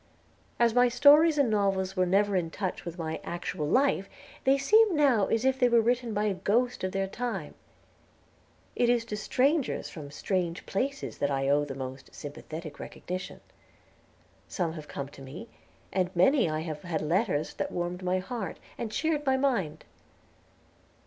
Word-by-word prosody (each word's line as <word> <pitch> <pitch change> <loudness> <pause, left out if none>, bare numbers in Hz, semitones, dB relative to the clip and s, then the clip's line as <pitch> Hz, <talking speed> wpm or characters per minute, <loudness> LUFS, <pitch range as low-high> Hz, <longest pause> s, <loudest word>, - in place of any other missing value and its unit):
As 235 -1 +4
my 245 +1 +5
stories 295 +5 +6
and 275 -6 +3
novels 195 -2 +1
were 185 -1 +2
never 200 +2 +2
in 175 -3 0
touch 185 +2 -4
with 170 0 -6
my 160 -2 -3
actual 170 -3 -4
life, 255 - +2 0.4
they 270 +1 +5
seem 415 +7 +4
now 265 -9 +4
as 225 +2 0
if 265 0 +2
they 250 -2 +4
were 235 -1 +5
written 240 +1 +1
by 210 0 0
a 210 -2 +1
ghost 225 +6 0
of 185 - -1
their 195 0 0
time. 195 -5 -4 1.2
It 240 - +2
is 240 -1 +2
to 215 - -4
strangers 270 +7 0
from 150 -4 -8
strange 170 +3 -2
places 275 +7 -3
that 140 - +1
I 135 -1 0
owe 145 +1 +3
the 135 -2 -6
most 130 0 -8
sympathetic 155 +1 -8
recognition. 180 +1 -6 1.1
Some 170 -4 -2
have 155 -2 -9
come 140 - -5
to 140 - -14
me, 150 - -9 0.5
and 185 -1 +1
from 180 - -12
many 240 - +4
I 155 0 -2
have 155 -2 -5
had 165 -4 -3
letters 165 -2 0
that - - -3
warmed 175 +1 -3
my 185 0 0
heart, 195 +3 -4 0.2
and 225 -2 -3
cheered 310 +4 0
my 265 -2 +2
mind. 240 - -1
195 Hz, 175 wpm, -28 LUFS, 165-245 Hz, 1.2 s, stories